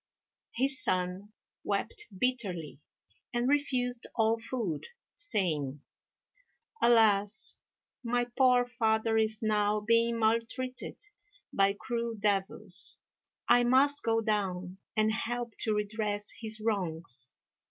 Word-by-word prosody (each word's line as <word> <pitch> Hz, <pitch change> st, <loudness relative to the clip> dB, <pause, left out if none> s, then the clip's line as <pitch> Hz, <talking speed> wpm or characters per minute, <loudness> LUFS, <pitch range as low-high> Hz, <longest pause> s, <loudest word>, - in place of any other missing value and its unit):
His 265 Hz, +2 st, +5 dB
son 185 Hz, -1 st, -1 dB, 0.3 s
wept 420 Hz, -, -2 dB
bitterly, 190 Hz, -, -2 dB, 0.6 s
and 240 Hz, +1 st, +1 dB
refused 255 Hz, -4 st, 0 dB
all 225 Hz, -1 st, +3 dB
food, 225 Hz, -, -4 dB, 0.3 s
saying, 155 Hz, -, -2 dB, 1.0 s
"Alas! 215 Hz, -3 st, +4 dB, 0.5 s
my 245 Hz, 0 st, 0 dB
poor 250 Hz, -2 st, +4 dB
father 225 Hz, -2 st, +1 dB
is 220 Hz, 0 st, 0 dB
now 210 Hz, -1 st, +2 dB
being 230 Hz, +2 st, +2 dB
maltreated 230 Hz, +3 st, -1 dB, 0.5 s
by 195 Hz, 0 st, +3 dB
cruel 235 Hz, -1 st, -3 dB
devils; 200 Hz, -1 st, +1 dB, 0.5 s
I 245 Hz, -, +5 dB
must 275 Hz, +4 st, +3 dB
go 225 Hz, 0 st, +1 dB
down 190 Hz, -4 st, -2 dB, 0.2 s
and 215 Hz, 0 st, +3 dB
help 240 Hz, +1 st, -3 dB
to 215 Hz, -2 st, 0 dB
redress 210 Hz, 0 st, -2 dB
his 220 Hz, -1 st, -4 dB
wrongs." 165 Hz, -, -2 dB
220 Hz, 100 wpm, -30 LUFS, 200-240 Hz, 1.0 s, His